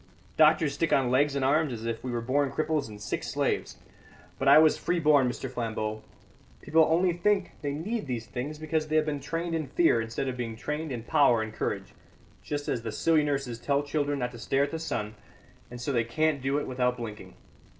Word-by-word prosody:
Doctors 155 -1 +4
stick 165 - -1
on 130 -2 +3
legs 140 +2 +3
and 135 -1 0
arms 150 +1 +2
as 115 -2 -6
if 115 -1 -3
we 130 - -4
were 120 -1 -2
born 135 +3 +1
cripples 155 -3 -1
and 105 -1 -10
sick 105 - -3
slaves. - - -2 0.6
But 135 - -1
I 140 - +9
was 155 0 +6
free 175 - -1
born, 145 -5 +4
Mr. 130 - -5
Flambeau! 110 -3 -3 0.6
People 160 0 +3
only 175 +2 +3
think 195 +2 +1
they 145 -1 -2
need 205 +5 -3
these 120 -3 -3
things 135 +7 -5
because 155 0 -2
they 155 - -1
have 155 -1 +4
been 150 -2 -2
trained 165 +3 -3
in 160 -3 -2
fear 135 -4 +3
instead 115 +4 -3
of 130 - -2
being 115 -2 -4
trained 150 +6 -4
in 120 -3 -4
power 130 -5 +3
and 110 0 -7
courage, - - -3 0.5
just 145 -1 -4
as 120 - -1
the 115 -1 -4
silly 155 +7 +2
nurses 135 -5 -2
tell 140 +2 0
children 145 0 -1
not 125 -2 -2
to 120 - -11
stare 135 +4 +1
at 140 - -2
the 160 - -3
sun, 105 -9 -3 0.6
and 120 - -9
so 135 +4 -2
they 120 -3 +2
can't 150 +4 0
do 135 +2 0
it 145 - -2
without 125 -1 0
blinking. 110 -3 -8
140 Hz, 220 wpm, -28 LUFS, 120-155 Hz, 0.6 s, I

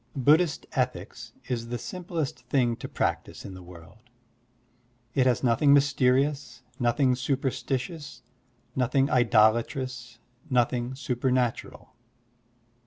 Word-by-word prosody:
Buddhist 150 +5 +3
ethics - - -3 0.2
is 115 -2 -3
the 120 +1 -3
simplest 175 - -4
thing 120 -4 +1
to - - -7
practise - - -3
in 95 - -8
the 95 - -10
world. 90 +2 -14 1.1
It 130 -1 +3
has 125 0 +1
nothing 135 +4 +4
mysterious, 135 -1 +1 0.2
nothing 125 +2 +2
superstitioxis, 130 +1 -3 0.5
nothing 135 +2 +1
idolatrous, 120 +1 +2 0.3
nothing 125 0 0
supernatural. 125 -1 -2
125 Hz, 100 wpm, -27 LUFS, 120-140 Hz, 1.1 s, nothing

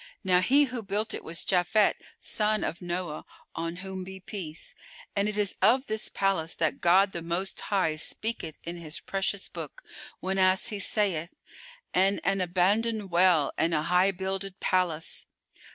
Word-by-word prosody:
Now 180 -2 +4
he 275 +9 +5
who 250 -4 -3
built 210 +2 -2
it - - -5
was 165 +1 -5
Japhet 190 +3 +3 0.2
son 215 0 +1
of 170 - -3
Noah 175 -3 -3 0.3
(on 165 +1 -3
whom 190 -1 -5
be 190 +1 -8
peace!) 180 -4 -6 0.4
and 200 +1 +2
it 210 - -4
is 205 -2 +1
of 245 +7 +4
this 215 -2 -3
palace 190 -4 0
that 160 -2 0
God 190 +3 +5
the 170 - -5
Most 170 +3 -2
High 185 -6 0
speaketh 170 -2 -3
in 170 +1 -5
His 160 -1 -4
precious 195 0 -2
Book, - - -8 0.4
whenas 190 +2 +2
He 210 -3 -4
saith, 190 -5 0 0.6
"And 195 +2 +3
an 195 0 +1
abandoned 200 +4 +1
well 170 -4 +4
and 165 0 +2
a 150 - +1
high 180 +3 +4
builded 190 0 -4
palace." 175 -4 0
190 Hz, 160 wpm, -28 LUFS, 170-200 Hz, 0.6 s, he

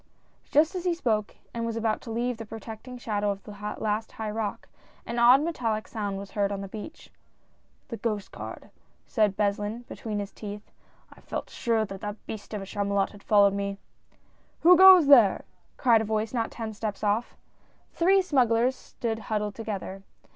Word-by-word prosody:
Just 310 +4 +4
as 365 -2 -4
he 355 -2 +1
spoke 220 -9 -1 0.2
and 230 - -3
was 230 -1 -2
about 225 -1 0
to 235 - -10
leave 240 +1 -1
the 225 - -7
protect 220 +2 -9
ing 250 0 -7
shadow 210 -3 -1
of 200 -1 -3
the - - -10 0.3
last 215 +1 -2
high 220 -1 -4
rock, 215 -1 -4 0.4
an 235 +1 -3
odd 250 +4 +7
metallic 230 -10 -2
sound 205 -3 -3
was 195 0 -8
heard 200 -1 0
on 200 -1 -3
the 195 - -6
beach. 220 +11 -9 0.4
" - - -40
The 230 - -6
Coast 210 -4 -3
Guard," - - -9 0.3
said 210 -4 +1
Beslin, 210 +3 -1
between 215 -2 -5
his 205 -1 -4
teeth. 210 0 -9 0.4
"I - - -19
felt - - -5
sure 225 -2 0
that 205 +1 -7
beast 205 -2 -8
of 200 - -4
a - - -7
Chamulot 200 0 -1
had 205 - -14
followed 200 -2 +4
me! 200 0 -3 0.3
" - - -37
" - - -38
Who 355 +2 +9
goes 375 -2 +9
there! 240 -9 +6 0.2
" - - -39
cried 235 -4 +4
a - - -1
voice 220 +1 -1
not 230 -2 0
ten 225 -2 -6
steps 210 -1 -5
off. 210 +3 0 0.5
The - - -29
three 380 +3 +5
smugglers 250 -5 +2
stood 225 -3 -5
huddled 210 -1 -1
together. 200 -3 -5
220 Hz, 195 wpm, -27 LUFS, 205-235 Hz, 0.5 s, Who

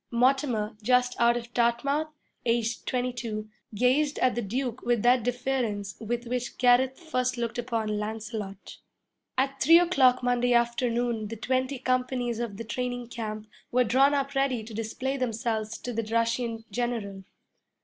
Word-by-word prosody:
Mortimer, 245 -3 +1
just 250 +2 +2
out 235 0 +4
of 240 0 -8
Dartmouth, 245 +6 +1 0.4
aged 230 -1 0
twenty 250 0 0
two, 215 -3 -5 0.2
gazed 270 +6 +2
at 255 - +3
the 240 - -2
Duke 245 +3 -3
with 240 -3 +1
that 245 +1 +5
deference 240 -5 -2
with 235 +2 -3
which 245 0 -3
Gareth 255 +1 +4
first 255 -7 -1
looked 235 0 -2
upon 225 -3 -1
Lancelot. 210 -2 -6 0.6
At 270 +1 0
three 330 +4 +8
o'clock 270 -8 +4
Monday 245 0 +2
afternoon 235 -1 +1
the 230 - -6
twenty 260 +4 -1
companies 250 -2 -1
of 230 -4 -4
the 230 - -5
training 245 +1 -3
camp 215 -2 -5 0.3
were 250 +1 +4
drawn 270 +5 +4
up 275 0 -1
ready 270 -4 +1
to 220 +1 -10
display 230 +5 -3
themselves 225 -3 -2
to 245 - -6
the 230 - 0
Russian 230 +1 -1
general. 225 -5 -3
240 Hz, 150 wpm, -27 LUFS, 225-255 Hz, 0.6 s, three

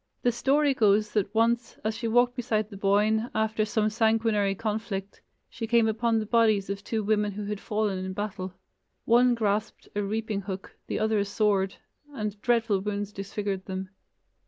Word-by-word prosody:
The 245 - +4
story 275 +4 +2
goes 210 -3 +3
that 205 -2 0
once, 230 +1 +1
as 215 +1 -1
she 230 +1 -3
walked 245 +2 +3
beside 220 -4 -1
the - - -8
Boyne, 210 +4 +2
after 220 0 +1
some 215 -1 0
sanguinary 220 -2 +2
conflict, 205 -2 -4 0.3
she 230 -1 -6
came 230 -1 +4
upon 225 +1 +1
the 215 - -1
bodies 215 -3 +3
of 200 0 -5
two 220 0 -2
women 210 0 +1
who 205 +1 -5
had 205 0 -3
fallen 210 -3 -1
in 190 0 -4
battle. 190 -2 -4 0.5
One 240 +1 +5
grasped 215 -1 -1
a 205 - +1
reaping 210 0 -2
hook, 195 -1 -7
the - - -2
other 220 0 +1
a 200 - +1
sword, 200 -2 +1 0.4
and 210 -3 -4
dreadful 230 -4 +2
wounds 205 +1 -3
disfigured 195 -1 -4
them. 190 0 -4
215 Hz, 175 wpm, -27 LUFS, 200-225 Hz, 0.5 s, One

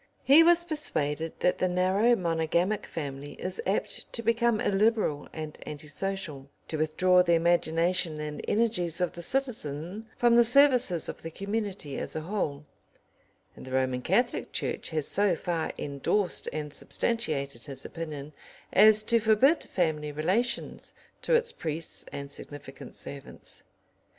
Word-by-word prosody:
He 285 +4 +8
was 345 +1 +5
persuaded 165 - -2
that 180 - +2
the 185 - +2
narrow 190 +6 +3
monogamic 170 +2 0
family 145 -2 -6
is 185 +1 -4
apt 195 - -2
to 230 - -3
become 230 0 +2
illiberal 205 -8 +1
and 155 -1 -7
anti 150 0 -8
social, 165 -8 -4 0.2
to 160 - -2
withdraw 180 +4 +4
the 170 -1 +3
imagination 165 -1 +1
and 150 0 -5
energies 205 -7 +1
of 180 -1 +1
the 175 - -9
citizen 210 - -3
from 240 -1 +4
the 240 - +8
services 245 - +4
of - - -7
the 165 - -6
community 200 -5 -4
as - - -6
a 155 - -2
whole, 155 -5 -3 0.9
and - - -11
the 130 - -9
Roman 130 -1 +1
Catholic 240 - 0
Church - - -3
has 155 -3 -2
so 200 -3 +3
far 165 -1 -2
endorsed 150 +7 0
and 150 -1 -5
substantiated 140 - -2
his 140 -3 -2
opinion 150 -3 -6 0.4
as 215 +2 +7
to 230 +1 +4
forbid 225 +9 +4
family 155 -4 -1
relations 190 +11 -1 0.3
to - - +2
its 470 0 +2
priests 160 0 -5
and 140 0 -6
significant 145 -1 -9
servants. 140 -1 -8
175 Hz, 145 wpm, -28 LUFS, 150-220 Hz, 0.9 s, He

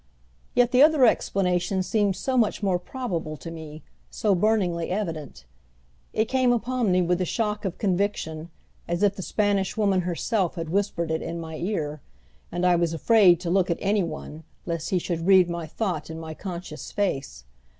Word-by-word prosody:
Yet 245 0 +4
the 250 - +5
other 300 -3 +6
explanation 185 -3 +1
seemed 205 -1 +1
so 265 +5 -2
much 225 -3 +1
more 185 -3 +2
probable 175 - -4
to 165 +5 -8
me, 160 -1 -9 0.3
so 210 -2 +1
burningly 180 -4 +1
evident. 165 - -4 0.7
It 220 - +1
came 255 +1 +2
upon 240 -2 0
me 180 0 +3
with 175 +1 +1
the 185 - 0
shock 210 +2 -2
of 185 - -3
conviction, 180 -5 -1 0.4
as 170 +3 -1
if 200 -1 +3
the 190 - -6
Spanish 200 0 0
Woman 200 -3 +2
herself 180 +2 -1
had 165 -2 -4
whispered 180 -4 0
it 160 - -1
in 170 - -4
my 160 -1 -6
ear, 155 -6 -3 0.5
and 175 +1 -1
I 180 -1 +5
was 170 -1 0
afraid 185 -1 +5
to 170 -2 -2
look 185 -1 +2
at 170 - +1
any 205 +1 +1
one 155 -2 -6 0.2
lest 165 -2 -3
he 185 - +2
should 170 -1 -3
read 190 -2 +6
my 170 -2 -4
thought 170 -3 -3
in 160 0 -6
my 160 -1 -6
conscious 170 -3 -7
face. 135 - -2
180 Hz, 180 wpm, -25 LUFS, 165-210 Hz, 0.7 s, other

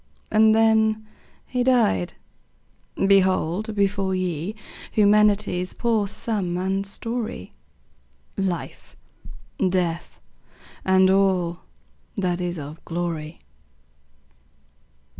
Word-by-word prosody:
And 220 0 +5
then 220 -1 +3 0.4
he 250 -1 -1
died! 235 - +2 0.9
Behold 195 +1 +2
before 195 -1 +1
ye 180 +1 -2 0.4
Humanity's 205 -3 +3
poor 225 -4 +1
sum 195 -4 -2
and 190 +2 -1
story; 225 - -5 0.8
Life, 185 -3 -4 0.6
Death, 180 -3 -1 0.6
and 190 0 +4
all 185 -3 +2 0.6
that 180 -2 -1
is 175 -1 -3
of 150 +2 -8
glory. 165 -2 -4
190 Hz, 80 wpm, -23 LUFS, 175-215 Hz, 0.9 s, And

